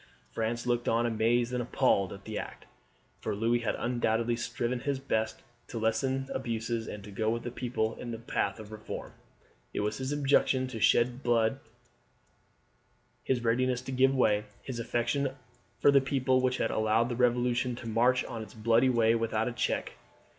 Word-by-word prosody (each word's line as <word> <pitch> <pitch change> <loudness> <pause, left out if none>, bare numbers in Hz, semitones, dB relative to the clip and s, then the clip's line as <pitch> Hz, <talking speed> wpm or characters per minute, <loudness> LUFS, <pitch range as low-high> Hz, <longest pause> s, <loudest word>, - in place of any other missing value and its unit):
France 115 +1 -2
looked 120 -1 0
on 115 +1 +2
amazed 120 +2 +1
and 125 - 0
appalled 120 -5 +2
at 100 0 -9
the 110 - -5
act, - - -8 0.5
for - - -3
Louis 115 +3 +2
had 115 - -1
undoubtedly 120 -1 0
striven 120 +1 -2
his 140 +2 -1
best 110 -5 -2 0.2
to 120 - -6
lessen 130 +4 0
abuses 115 -2 -2
and 105 -1 -7
to 105 - -10
go 110 +2 0
with 115 +1 -1
the 120 - -4
people 120 -3 -1
in 120 - -6
the 115 - -4
path 115 0 -2
of 110 0 -10
reform. 110 - -7 0.6
It - - 0
was 105 +1 -2
his 130 +1 -3
objection 140 -2 +2
to 115 -3 -6
shed 120 +4 +3
blood, 120 +1 +2 1.6
his 125 -2 0
readiness 125 +2 +1
to 130 - -6
give 135 +1 +3
way, 105 -5 +3 0.2
his 125 -3 -5
affection 130 +4 -1 0.4
for 145 - +5
the 140 -1 +6
people, 130 -1 +1
which 130 0 +1
had - - 0
allowed 110 +2 +2
the 120 - -2
Revolution 125 0 +1
to 120 -1 -8
march 120 +3 +2
on 115 - -6
its 110 - -10
bloody 115 +3 +3
way 115 -2 +4
without 115 -1 0
a - - -1
check. 120 - -1
120 Hz, 180 wpm, -30 LUFS, 115-130 Hz, 1.6 s, the